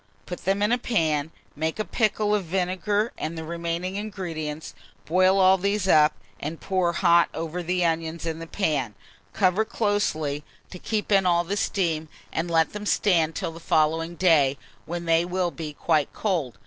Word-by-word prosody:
Put 180 - -7
them 195 +2 +1
in 210 - +2
a 245 - +2
pan, 160 -11 0 0.3
make 160 +2 -2
a 215 - -2
pickle 215 -2 +1
of 205 -3 0
vinegar 190 +5 -1
and 160 +2 -4
the 160 - -4
remaining 170 +3 -3
ingredients, 165 -7 -5 0.3
boil 185 +3 +3
all 190 0 +5
these 200 +1 0
up, 155 -3 +5 0.3
and 155 +3 -5
pour 185 -3 0
hot 170 -1 +4
over 165 +2 -4
the 180 +1 0
onions 165 0 -2
in 165 -1 -3
the 165 - -7
pan. 145 - -1 0.4
Cover 185 -2 +2
very - - -15
closely 155 -9 0 0.3
to 180 - -8
keep 215 +1 -2
in 195 -2 +4
all 170 -1 +3
the 190 +4 -3
steam, 165 -6 -1 0.2
and 165 +2 -2
let 165 -1 +2
them 210 0 -5
stand 165 -7 +2
till - - -3
the 165 - -10
following 165 +1 +1
day, 150 -6 +3 0.3
when 170 +1 -4
they 165 0 +3
will 180 0 -1
be 160 -3 -6
quite 150 -1 0
cold. 170 - -2
170 Hz, 180 wpm, -25 LUFS, 160-195 Hz, 0.4 s, all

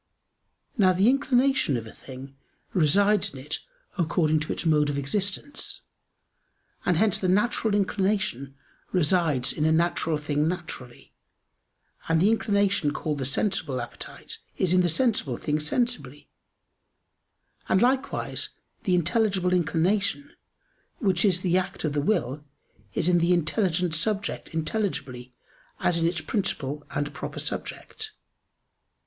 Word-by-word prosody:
Now 185 -2 +6
the 190 +4 +3
inclination 265 - +2
of 115 - -5
a 110 - -10
thing 135 +1 -11 0.4
resides 200 +5 +3
in - - -7
it 150 +4 -4 0.4
according 155 -2 +2
to 155 - -3
its - - -3
mode 150 -2 +3
of 145 - -2
existence; 200 - -3 1.1
and 180 - +3
hence 215 +1 +3
the 185 - 0
natural 210 +2 +2
inclination 190 - 0 0.4
resides 160 -7 +2
in 150 - -2
a 160 - +3
natural 165 -1 +1
thing 150 0 0
naturally, 160 -8 -6 1.0
and 165 0 +3
the 200 +6 +4
inclination 200 -8 +1
called 150 -1 -2
the 130 - -1
sensible 150 -4 0
appetite 120 - -7 0.2
is 185 -2 +2
in 185 - +5
the 175 - +2
sensible 165 - +1
thing 150 +1 -1
sensibly; 150 - -2 1.4
and 185 - +4
likewise 265 +4 0 0.4
the 185 -3 +3
intelligible 180 +1 +1
inclination, 195 - +1 0.7
which 190 -5 +1
is 185 -4 +3
the 180 0 +3
act 185 - -5
of 155 -3 0
the 145 - +1
will, 150 - 0 0.5
is - - +2
in 175 -1 +4
the 170 +2 +3
intelligent 175 0 +1
subject 200 +5 -1
intelligibly 140 - -3 0.4
as 170 -1 +1
in 165 - +2
its 170 -1 -1
principle 150 - -2
and 145 0 -3
proper - - -6
subject. - - -5
175 Hz, 130 wpm, -26 LUFS, 150-200 Hz, 1.4 s, Now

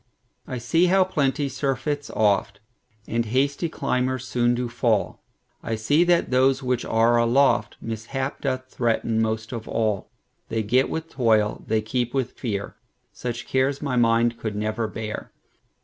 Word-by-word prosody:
I 130 - -4
see 165 +10 +2
how 190 +1 +5
plenty 145 -5 0
surfeits 140 +2 -2
oft, 100 -1 +1 0.5
And 115 +1 0
hasty 140 +7 0
climbers 130 -3 -1
soon 120 0 +2
do 125 0 -2
fall;I 115 -1 -3
see 145 +10 +3
that 175 -5 +2
those 130 +1 +3
which 125 -1 0
are 115 +1 +3
aloftMishap 120 +1 0
doth 130 -2 -2
threaten 115 -2 0
most 110 0 -2
of 115 -2 -6
all:They 110 +1 -3
get 125 +5 +2
with 160 0 -4
toil, 110 -5 +2
they 110 0 +1
keep 120 +3 -2
with 130 -2 0
fear:Such 120 +2 -6
cares 135 +1 +1
my 140 -3 -1
mind 115 0 +3
could 110 -2 -3
never 110 +2 -1
bear. 110 0 -6
120 Hz, 135 wpm, -24 LUFS, 110-135 Hz, 0.5 s, how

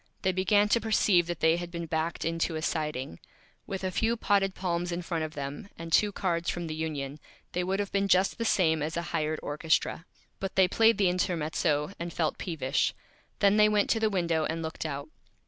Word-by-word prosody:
They 190 - +3
began 190 +3 +3
to 235 - +3
Perceive 205 -5 +3
that 175 -2 -4
they 160 +1 +4
had 175 0 -5
been 170 -1 -5
backed 160 0 -2
into 165 0 -1
a 155 - -3
Siding. 150 - -2 0.5
With 190 -1 -4
a 185 - -1
few 225 +5 +1
Potted 195 -3 +1
Palms 175 -1 -2
in 175 +1 -3
front 165 -2 -2
of 155 0 -5
them, 145 +6 -6
and 165 0 -7
two 210 -1 +4
Cards 175 -4 -1
from 175 -1 -3
the 160 - -4
Union, 150 -3 -4 0.3
they 180 - -1
would 190 +2 -1
have 200 -1 -2
been 200 0 +1
just 190 +4 +3
the - - 0
same 160 -8 +2
as 160 +3 -2
a 170 - -1
Hired 155 -1 0
Orchestra. 160 +2 0 0.3
But 195 -1 -4
they 190 -1 +5
played 225 +4 +4
the 200 -3 +3
Intermezzo 165 -3 0
and 170 0 -4
felt 160 -1 -1
Peevish. 150 -5 -1 0.5
Then 200 0 +5
they 210 0 +6
went 210 -1 +2
to 225 - +2
the 220 -1 +2
Window 170 -5 0
and 165 +1 -2
looked 160 0 -4
out. 140 0 -5
170 Hz, 215 wpm, -29 LUFS, 160-195 Hz, 0.5 s, they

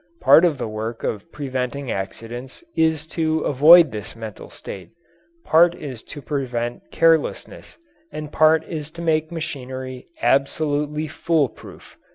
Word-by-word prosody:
Part 145 +6 +7
of 160 -5 +1
the 125 - -3
work 110 +2 -5
of 110 +10 -4
preventing 130 -1 -4
accidents 115 - -6
is 160 -1 +1
to 160 -1 0
avoid 155 +3 +7
this 110 +2 -7
mental 110 -2 -9
state; 95 -2 -9 0.6
part 170 +2 +5
is 130 -6 -7
to 145 - -9
prevent 125 -5 -3
carelessness, 165 -2 0 0.3
and 150 -1 -7
part 155 +1 +4
is 155 -3 -6
to - - -5
make 155 -1 +1
machinery 130 -5 -6
absolutely 150 +2 0
fool 155 -2 +1
proof. - - -15
145 Hz, 135 wpm, -22 LUFS, 125-160 Hz, 0.6 s, Part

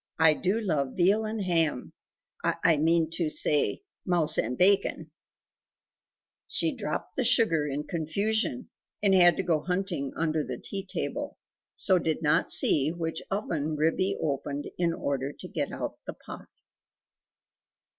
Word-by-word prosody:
I 160 -1 +6
do 190 +7 0
love 150 - -1
veal 200 +5 +3
and 215 -1 -3
ham 165 -7 0 0.5
I 165 -2 +2
mean 160 +1 +2
to 165 -1 -1
say 150 - +2 0.2
mouse 175 -4 +1
and 125 +3 -1
bacon 185 -4 +2 0.6
" - - -67
She - - -1
dropped - - -5
the 260 - 0
sugar 220 -11 +2
in 145 +1 -3
confusion, 180 - -2 0.3
and 200 -2 +4
had 175 -3 +6
to - - -1
go 165 -4 +1
hunting 180 -5 -2
under 160 -1 0
the - - -5
tea 195 -1 -5
table, - - -4 0.4
so 185 -3 +3
did 160 -1 -2
not 155 +3 +2
see 150 -4 +4
which 165 -1 -3
oven 160 -7 -2
Ribby 165 +5 +1
opened 145 0 -3
in 170 -1 +2
order 140 -3 -2
to - - -10
get - - -3
out - - -5
the - - -4
pie. - - -11
165 Hz, 145 wpm, -28 LUFS, 150-190 Hz, 0.6 s, I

